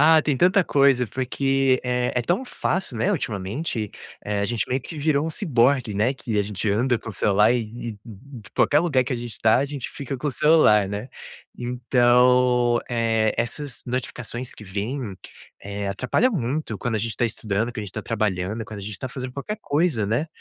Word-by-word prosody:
Ah, 155 Hz, +1 st, +6 dB
tem 145 Hz, -2 st, 0 dB
tanta 185 Hz, +6 st, +4 dB
coisa, 140 Hz, -5 st, +3 dB
porque, 135 Hz, +1 st, +1 dB
eh, 125 Hz, 0 st, 0 dB
é 125 Hz, -, +1 dB
tão 180 Hz, -, 0 dB
fácil, 185 Hz, -, -2 dB
né, 110 Hz, -, +1 dB
ultimamente, 105 Hz, -, -3 dB, 0.3 s
eh, 105 Hz, -1 st, -1 dB
a 100 Hz, -, 0 dB
gente 115 Hz, +1 st, -1 dB
meio 130 Hz, +1 st, 0 dB
que 160 Hz, -, -9 dB
virou 150 Hz, 0 st, +1 dB
um 165 Hz, -, -2 dB
ciborgue, 130 Hz, -, +2 dB
né, 110 Hz, +7 st, +1 dB
que 115 Hz, -5 st, -3 dB
a -, -, +3 dB
gente 105 Hz, +1 st, -2 dB
anda 120 Hz, +5 st, +2 dB
com 115 Hz, -, -10 dB
o -, -, -5 dB
celular 105 Hz, +3 st, +3 dB
e 125 Hz, -, +2 dB, 0.3 s
e 105 Hz, -, -10 dB
e 125 Hz, +4 st, -11 dB
e -, -, -15 dB
qualquer 145 Hz, -, +4 dB
lugar 150 Hz, -6 st, +2 dB
que 130 Hz, +2 st, -4 dB
a -, -, 0 dB
gente 120 Hz, -1 st, -7 dB
tá, 110 Hz, +5 st, +4 dB
gente 140 Hz, -3 st, -5 dB
fica 140 Hz, -1 st, -5 dB
com 145 Hz, +4 st, -2 dB
o -, -, 0 dB
celular, 130 Hz, -8 st, +5 dB
né? 105 Hz, +5 st, -5 dB, 0.5 s
Então, 125 Hz, 0 st, +3 dB
eh, 115 Hz, -2 st, +1 dB
essas 125 Hz, +3 st, -3 dB
notificações 125 Hz, -1 st, -4 dB
que -, -, -12 dB
vêm, 105 Hz, +2 st, -4 dB, 0.4 s
eh, 100 Hz, 0 st, -4 dB
atrapalha 130 Hz, -, +1 dB
muito 135 Hz, -, -2 dB
quando 120 Hz, +4 st, -2 dB
a -, -, +1 dB
gente 110 Hz, +1 st, -3 dB
tá -, -, +1 dB
estudando, 110 Hz, 0 st, -1 dB
que 120 Hz, -, -5 dB
a -, -, -4 dB
gente 100 Hz, -2 st, -8 dB
tá -, -, -5 dB
trabalhando, 105 Hz, -1 st, -1 dB
quando 105 Hz, -1 st, -8 dB
a -, -, -8 dB
gente 100 Hz, -1 st, -6 dB
tá 130 Hz, -, -4 dB
fazendo 130 Hz, 0 st, -6 dB
qualquer 140 Hz, +11 st, -4 dB
coisa, 145 Hz, -, +1 dB
né. 120 Hz, +10 st, 0 dB
125 Hz, 205 wpm, -24 LUFS, 110-135 Hz, 0.5 s, Ah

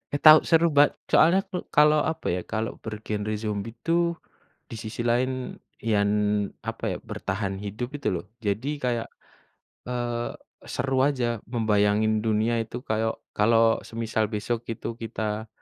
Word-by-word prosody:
Eh 145 Hz, -, -2 dB
tau 155 Hz, 0 st, +11 dB
seru 165 Hz, 0 st, +5 dB
ba 145 Hz, -, +10 dB, 0.3 s
soalnya 175 Hz, +5 st, +6 dB
klu 185 Hz, -2 st, -3 dB, 0.2 s
kalau 150 Hz, +1 st, +6 dB
apa -, -, -6 dB
ya, -, -, -2 dB
kalau 110 Hz, +1 st, -1 dB
bergenre 105 Hz, -1 st, -3 dB
zombie 105 Hz, +1 st, -3 dB
tuh 170 Hz, 0 st, +2 dB, 0.6 s
di -, -, -5 dB
sisi 110 Hz, +2 st, -5 dB
lain 125 Hz, +2 st, -1 dB, 0.2 s
yang 105 Hz, -2 st, +2 dB, 0.5 s
apa -, -, -6 dB
ya, -, -, -4 dB
bertahan 95 Hz, 0 st, -3 dB
hidup 105 Hz, +4 st, -4 dB
itu -, -, -3 dB
loh. 85 Hz, -, -4 dB, 0.2 s
Jadi 110 Hz, +4 st, -2 dB, 0.2 s
kayak, 120 Hz, -2 st, 0 dB, 0.8 s
eee, 120 Hz, -1 st, -2 dB, 0.5 s
seru 135 Hz, 0 st, 0 dB
aja 120 Hz, -5 st, -1 dB
membayangin 110 Hz, -2 st, +2 dB
dunia 110 Hz, +1 st, +2 dB
itu 115 Hz, -, -8 dB
kayau 110 Hz, +1 st, 0 dB, 0.2 s
kalau 115 Hz, +1 st, +4 dB
semisal 110 Hz, -1 st, -1 dB
besok 110 Hz, +2 st, -2 dB
itu -, -, -6 dB
kita, 110 Hz, -1 st, -3 dB
115 Hz, 140 wpm, -26 LUFS, 110-125 Hz, 0.8 s, tau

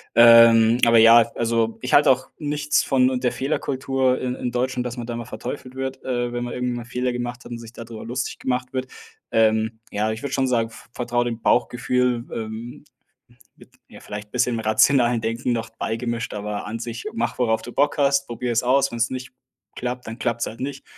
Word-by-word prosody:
Ähm, 115 Hz, -1 st, +7 dB
aber 115 Hz, -1 st, +6 dB
ja, 115 Hz, +1 st, +8 dB, 0.2 s
also 115 Hz, -1 st, 0 dB
ich -, -, -3 dB
halte -, -, +6 dB
auch -, -, -1 dB
nichts 150 Hz, 0 st, 0 dB
von 130 Hz, -2 st, +3 dB
und 130 Hz, -1 st, -3 dB
der 125 Hz, -, +2 dB
Fehlerkultur 135 Hz, -2 st, -1 dB
i -, -, -3 dB
in 125 Hz, -1 st, -3 dB
Deutschland, 125 Hz, 0 st, -1 dB
dass 120 Hz, -, -4 dB
man 120 Hz, -, -5 dB
da 120 Hz, -, -4 dB
immer 120 Hz, 0 st, -5 dB
verteufelt 125 Hz, +4 st, -7 dB
wird, 130 Hz, 0 st, -5 dB
äh, 120 Hz, -1 st, -1 dB
wenn 120 Hz, 0 st, -2 dB
man 120 Hz, -, -5 dB
irgendwie 125 Hz, 0 st, -2 dB
mal 120 Hz, -1 st, -6 dB
Fehler 125 Hz, +1 st, -2 dB
gemacht 120 Hz, 0 st, -5 dB
hat -, -, -11 dB
und 120 Hz, -, -4 dB
sich 115 Hz, 0 st, -11 dB
da -, -, -8 dB
drüber 115 Hz, -1 st, -9 dB
lustig 125 Hz, +2 st, -3 dB
gemacht 125 Hz, 0 st, -2 dB
wird. 130 Hz, 0 st, -2 dB, 0.4 s
Ähm, 110 Hz, 0 st, +2 dB
ja, 105 Hz, +2 st, 0 dB
ich 110 Hz, -, -5 dB
würde 140 Hz, -, -4 dB
schon 130 Hz, -1 st, +1 dB
sagen, 115 Hz, -2 st, +1 dB
v 115 Hz, 0 st, -15 dB
vertraue 120 Hz, 0 st, -1 dB
dem 115 Hz, -1 st, -4 dB
Bauchgefühl, 125 Hz, 0 st, +1 dB
ähm, 110 Hz, +2 st, -6 dB, 0.7 s
mit -, -, -18 dB, 0.2 s
ja -, -, -13 dB
vielleicht 105 Hz, 0 st, -8 dB
bisschen 125 Hz, -1 st, +1 dB
rationalen 120 Hz, +2 st, +3 dB
Denken 115 Hz, +3 st, -1 dB
noch 115 Hz, -1 st, -3 dB
beigemischt. 115 Hz, +1 st, -3 dB
Aber 105 Hz, 0 st, -4 dB
an 115 Hz, +2 st, -4 dB
sich 115 Hz, 0 st, -6 dB
mach, 230 Hz, -, -2 dB
worauf 110 Hz, -3 st, +1 dB
du 120 Hz, -, -9 dB
Bock 145 Hz, +1 st, +1 dB
hast, 140 Hz, 0 st, +2 dB
probiere 120 Hz, +1 st, -3 dB
es 115 Hz, -, +1 dB
aus, 135 Hz, +2 st, +2 dB
wenn's 115 Hz, 0 st, 0 dB
nicht 130 Hz, 0 st, -6 dB, 0.5 s
klappt, 125 Hz, 0 st, -4 dB
dann 115 Hz, +1 st, -7 dB
klappt's 115 Hz, 0 st, -1 dB
halt 115 Hz, -, -8 dB
nicht. 140 Hz, +2 st, -5 dB
120 Hz, 210 wpm, -23 LUFS, 115-125 Hz, 0.7 s, ja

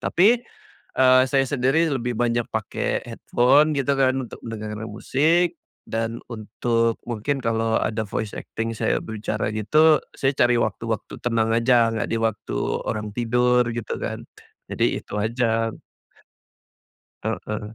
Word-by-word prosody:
Tapi, 215 Hz, +7 st, +4 dB, 0.6 s
eee, 130 Hz, 0 st, +6 dB
saya 135 Hz, +1 st, +3 dB
sendiri 140 Hz, +5 st, +1 dB
lebih 120 Hz, -2 st, -2 dB
banyak 120 Hz, 0 st, 0 dB
pakai 110 Hz, -2 st, -2 dB
headphone 140 Hz, +5 st, +3 dB
gitu 140 Hz, 0 st, +1 dB
kan, 130 Hz, -1 st, +3 dB
untuk 120 Hz, -, -10 dB
mendengarkan 110 Hz, -1 st, -5 dB
musik 160 Hz, +10 st, +1 dB, 0.3 s
dan 115 Hz, +1 st, -2 dB
untuk 115 Hz, +1 st, 0 dB
mungkin 120 Hz, +5 st, -1 dB
kalau 115 Hz, -1 st, 0 dB
ada 110 Hz, 0 st, -1 dB
voice 105 Hz, +1 st, -3 dB
acting 115 Hz, 0 st, -4 dB
saya -, -, 0 dB
bicara 110 Hz, -1 st, -3 dB
gitu, 150 Hz, +9 st, +4 dB, 0.2 s
saya 135 Hz, -, +1 dB
cari 120 Hz, 0 st, +4 dB
waktu-waktu 110 Hz, +1 st, -3 dB
tenang 115 Hz, -2 st, +1 dB
aja, 115 Hz, 0 st, +4 dB
nggak 110 Hz, -2 st, -2 dB
di -, -, 0 dB
waktu 110 Hz, -2 st, -2 dB, 0.3 s
orang 105 Hz, -1 st, -3 dB
tidur 125 Hz, +1 st, +2 dB
gitu 115 Hz, -2 st, -4 dB
kan, -, -, -4 dB, 0.5 s
jadi -, -, +1 dB, 0.2 s
itu -, -, -10 dB
aja. 115 Hz, 0 st, 0 dB, 1.5 s
Heeh. 105 Hz, 0 st, -4 dB
115 Hz, 130 wpm, -23 LUFS, 110-130 Hz, 1.5 s, eee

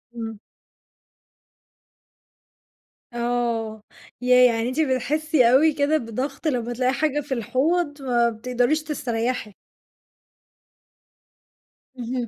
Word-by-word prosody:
إمم. 225 Hz, -2 st, -6 dB, 2.7 s
آه. 235 Hz, -3 st, -2 dB, 0.4 s
ياه! 250 Hz, 0 st, +6 dB
يعني 225 Hz, +2 st, -1 dB
أنتِ 255 Hz, -, -4 dB
بتحسّي 285 Hz, -1 st, +2 dB
أوي 305 Hz, +5 st, +5 dB
كده 285 Hz, +2 st, +2 dB
بضغط 265 Hz, +5 st, -4 dB
لمّا 240 Hz, -4 st, -1 dB
تلاقي 255 Hz, +2 st, 0 dB
حاجة 295 Hz, 0 st, 0 dB
في 275 Hz, -1 st, -4 dB
الحوض 290 Hz, +6 st, 0 dB
ما 240 Hz, -3 st, +2 dB
بتقدريش 250 Hz, +6 st, 0 dB
تستريّحي؟ 245 Hz, -6 st, -3 dB, 2.5 s
اهم. 245 Hz, 0 st, -3 dB
250 Hz, 90 wpm, -23 LUFS, 235-290 Hz, 2.7 s, ياه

